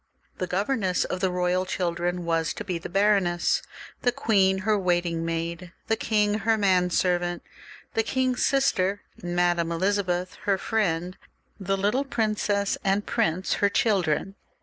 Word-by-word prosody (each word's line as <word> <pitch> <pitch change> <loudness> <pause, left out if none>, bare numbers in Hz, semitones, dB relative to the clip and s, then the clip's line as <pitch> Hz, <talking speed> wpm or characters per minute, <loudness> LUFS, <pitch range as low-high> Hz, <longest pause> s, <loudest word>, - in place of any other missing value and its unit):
The 185 - -1
governess 195 0 0
of 185 - -3
the 190 0 +1
royal 180 0 0
children 175 -1 -2
was 165 -1 0
to - - -5
be 175 -2 -3
the - - -7
baroness, 195 -3 +2 0.4
the 245 - +2
queen 200 -7 +2
her 215 -1 +3
waiting 175 -3 0
maid, 170 +2 -4 0.2
the 225 - +3
king 210 -1 +1
her 220 +2 +2
man 185 -3 +3
servant, 175 -1 0 0.5
the 225 - +2
king's 255 +2 0
sister, 205 -8 +1 0.2
Madame 175 -1 +1
Elizabeth, 185 0 -1
her 200 -2 +2
friend; 180 -5 -1 0.4
the 195 0 -1
little 210 +8 +1
princess 215 -5 0
and 195 +1 +1
prince 170 +4 0
her' 200 - +4
children. 195 -4 +1
185 Hz, 145 wpm, -26 LUFS, 175-205 Hz, 0.5 s, her